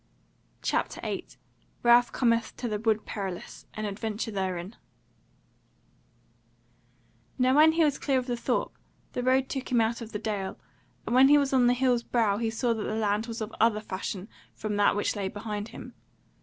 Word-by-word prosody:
CHAPTER - - -1
8 - - -5 0.5
Ralph 240 0 +6
Cometh 230 -2 +1
to 245 - -3
the 210 -2 -2
Wood 220 -1 +1
Perilous. 190 -4 -6
An 215 - -3
Adventure 215 +2 -3
Therein 190 0 -3 2.6
Now 255 +1 +3
when 315 +2 +7
he 330 0 +3
was 290 -2 +1
clear 275 -2 +1
of 255 - -1
the 245 -1 -1
Thorp 235 - -1 0.4
the - - -2
road 260 +1 +2
took 270 -1 -5
him 245 - +4
out 230 +1 0
of 230 -1 -7
the 210 - -3
dale; 205 -3 -3 0.5
and - - -2
when 260 +2 +7
he 295 - +7
was 280 -2 +1
on 250 -2 +5
the 245 - +4
hill's 250 -2 +2
brow 225 -4 +1
he 225 0 -1
saw 230 +2 0
that 220 - -4
the 215 - -2
land 215 +1 0
was 230 -1 -5
of 215 +1 -5
other 220 -1 +4
fashion 190 -1 -5 0.3
from 215 -1 -3
that 205 0 +4
which 205 - 0
lay 200 -2 -2
behind 210 +1 -5
him. 225 - -10
225 Hz, 185 wpm, -28 LUFS, 210-250 Hz, 2.6 s, when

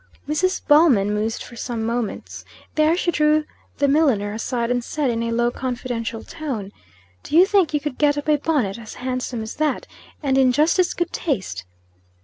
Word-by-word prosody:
Mrs. 370 +5 0
Ballman 280 -10 +5
mused 215 +2 -2
for 235 - -12
some 235 -1 -4
moments. 230 -2 -3 0.3
There 310 +2 +3
she 355 - +1
drew 305 -1 +3 0.3
the 285 - +2
milliner 270 -9 +2
aside, 235 +2 -2
and 245 -1 0
said, 285 0 -1
in 230 0 -2
a 230 - -1
low 235 +1 +1
confidential 245 -3 -4
tone. 265 -12 -5 0.5
"Do 310 - 0
you 360 - +8
think 390 -4 +2
you 295 - +1
could 290 -3 -5
get 290 -1 +3
up 290 - -4
a 300 -1 +4
bonnet 270 -10 0
a 220 -2 -10
handsome 250 -2 -3
as 220 - -7
that, 300 -3 0 0.4
and 270 -1 +2
in 255 -1 +4
just 305 +7 +3
as 360 - +2
good 345 -1 -2
taste?" 190 - -2
260 Hz, 185 wpm, -22 LUFS, 230-305 Hz, 0.5 s, you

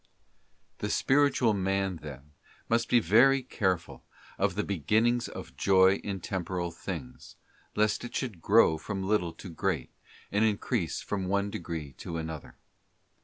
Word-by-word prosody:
Tue - - -2
spiritual 135 -5 +3
man, 95 -1 0
then, 75 -2 -10 0.4
must 115 0 +1
be 120 - +5
very 125 +8 +5
careful 95 -8 -2 0.4
of 100 -2 +1
the 105 - 0
be 100 -4 -3
ginnings 115 - +2
of - - -9
Joy 95 0 +5
in 100 -2 -5
Temporal 90 -2 -3
things, 80 -6 -7 0.4
lest 105 +1 +1
it 120 - -7
should 110 -11 -3
grow 100 -5 +5
from 95 +3 -4
little 95 -4 +1
to 95 - -10
be - - -10
great, 90 -7 -1 0.4
and 105 +2 +2
increase 105 -3 0
from 95 -3 -3
one 100 +1 0
degree 80 -6 -5
to 85 - -5
another. 80 -2 -6
95 Hz, 150 wpm, -29 LUFS, 85-110 Hz, 0.4 s, be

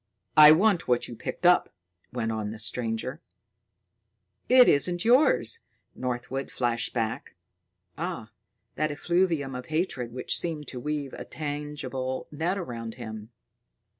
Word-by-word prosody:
"I 150 0 +10
want 185 +2 +3
what 125 -1 +1
you 120 - -8
picked 170 - -6
up," 180 0 +5 0.4
went 115 -2 -2
on 110 -2 -3
the 110 - -7
stranger. 115 +5 -3 1.3
"It 250 -1 +8
isn't 175 +6 +3
yours!" 270 - +4 0.3
Northwood 125 +2 -4
flashed 120 -2 -1
back. 115 -2 -3 0.6
Ah! - - -4 0.4
that 155 - 0
effluvium 165 -2 0
of 125 0 -6
hatred 155 -7 -2
which 125 +1 0
seemed 160 -3 -3
to 125 - -6
weave 145 0 -3
a - - -6
tangible 145 -3 -4
net 165 +6 -1
around 115 - -6
him! 110 -3 -8
135 Hz, 130 wpm, -27 LUFS, 120-160 Hz, 1.3 s, I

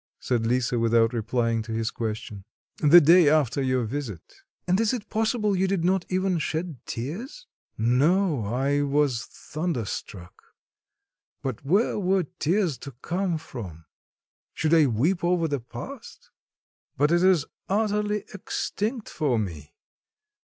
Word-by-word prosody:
said 115 -3 0
Lisa, 125 0 +1
without 115 0 +3
replying 115 0 0
to 110 +1 -8
his 110 0 -1
question. 110 -3 -5 0.3
"The 160 +3 +8
day 170 0 +6
after 145 -4 +2
your 130 -2 +1
visit." 115 - -6 0.3
"And 185 +2 +2
is 225 +2 +2
it 220 -3 -8
possible 220 -1 +1
you 190 +1 +1
did 190 -3 0
not 185 0 +2
even 185 -1 0
shed 160 -2 -3
tears?" 210 - -6 0.3
"No. 145 - +2
I 135 +6 0
was 140 -4 +1
thunderstruck; 115 - -5 1.1
but 130 -4 -4
where 195 - +2
were 190 -1 +2 0.2
tears 170 -3 +1
to 140 - -9
come 180 -1 -1
from? 95 - -9 0.7
Should 160 0 +1
I 160 -3 +6
weep 150 - 0
over 175 -1 +2
the 145 -2 -1
past? 120 - -10 0.7
but 145 +3 +3
it 175 0 +3
is 185 -5 +4 0.2
utterly 210 0 0
extinct 215 +3 -3
for 140 -6 0
me! 80 -7 -5
150 Hz, 135 wpm, -26 LUFS, 120-185 Hz, 1.1 s, The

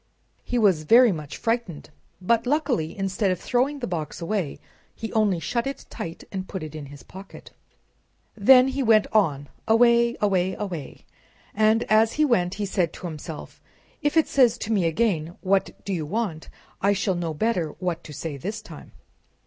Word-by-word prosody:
He 245 - -2
was 195 -8 +3
very 235 +9 +6
much 150 -5 -6
frightened, 225 -11 -3 0.3
but, 230 +6 +1
luckily, 260 - 0
instead 195 +1 0
of 185 -2 -1
throwing 260 +8 0
the 260 - -4
box 160 -5 -4
away 180 -4 -2 0.4
he 225 - -6
only 210 -5 +2
shut 235 +9 -2
it 275 - -6
tight 165 0 -7
and 190 -1 -5
put 190 -5 -5
it 155 - -7
in 150 -2 -7
his 140 0 -12
pocket. 195 +1 -12 0.8
Then 255 +5 +6
he 270 +1 -2
went 220 -4 +4
on, 145 -10 +2 0.2
away, 235 +1 +4
away, 190 -2 +1
away, 180 -9 -6 0.5
and 220 +2 +3
as 220 +1 +3
he 305 - +2
went 180 -9 +1
he 205 - -2
said 185 -4 0
to - - -9
himself, 160 -1 -8 0.4
"if 295 +2 0
it 320 - +4
says 245 -4 +4
to 225 - -4
me 195 -5 +2
again, 170 -3 -1
'What 195 0 +1 0.2
do 200 - -2
you 160 -4 -3
want?' 195 -4 -3 0.3
I 200 +1 +3
shall 200 -1 0
know 170 -3 -3
better 185 -4 0
what 175 -1 -3
to - - -9
say 150 0 -5
this 205 +10 -5
time." - - -12
195 Hz, 180 wpm, -24 LUFS, 170-230 Hz, 0.8 s, very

